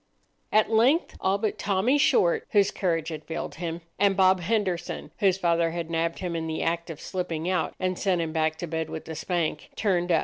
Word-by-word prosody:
At 215 +1 +3
length 250 +9 +3
all 190 +1 +2
but 210 +1 -2
Tommy 205 +8 +2
Short, 175 -10 +3
whose 205 -1 +4
courage 165 -5 -1
had 155 -2 -6
failed 165 - -4
him, 170 0 -3 0.2
and 200 -2 +3
Bob 185 -1 +5
Henderson, 180 -5 -2
whose 190 -2 +3
father 170 -2 +2
had 165 0 -4
nabbed 165 0 0
him 175 -2 -3
in 160 0 -2
the 160 0 -2
act 170 +1 -1
of 160 -2 -7
slipping 175 -3 -3
out, 180 -3 0
and 185 -1 -1
sent 185 -3 +1
him 160 -2 -2
back 160 -1 +1
to 170 +2 -5
bed 160 0 -3
with 160 - -7
a - - -3
spank, 160 -1 -2
turned 180 -4 +1
up. 165 - +5
175 Hz, 210 wpm, -26 LUFS, 165-195 Hz, 0.2 s, Bob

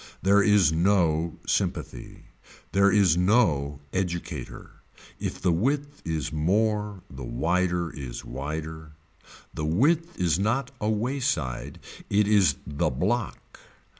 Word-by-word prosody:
There 100 +2 +5
is 100 -6 +4
no 85 -2 +2
sympathy. - - -3 0.5
There 100 0 +4
is 100 -6 +4
no 85 - +2
educator. 90 -2 -4 0.4
If - - -4
the 90 - +2
width 140 - -1
is 80 -3 -3
more 105 +4 0
the 65 -1 -9
wider 85 +7 0
is 65 -4 -7
wider. 80 +3 -6 0.6
The 75 - -4
width 160 - +1
is 85 -2 +2
not 120 +6 0
a 105 - 0
wayside 110 - -2 0.3
it 105 0 +3
is 100 -9 +4
the 75 -1 -1
block. 105 - -3
90 Hz, 115 wpm, -26 LUFS, 80-105 Hz, 0.6 s, There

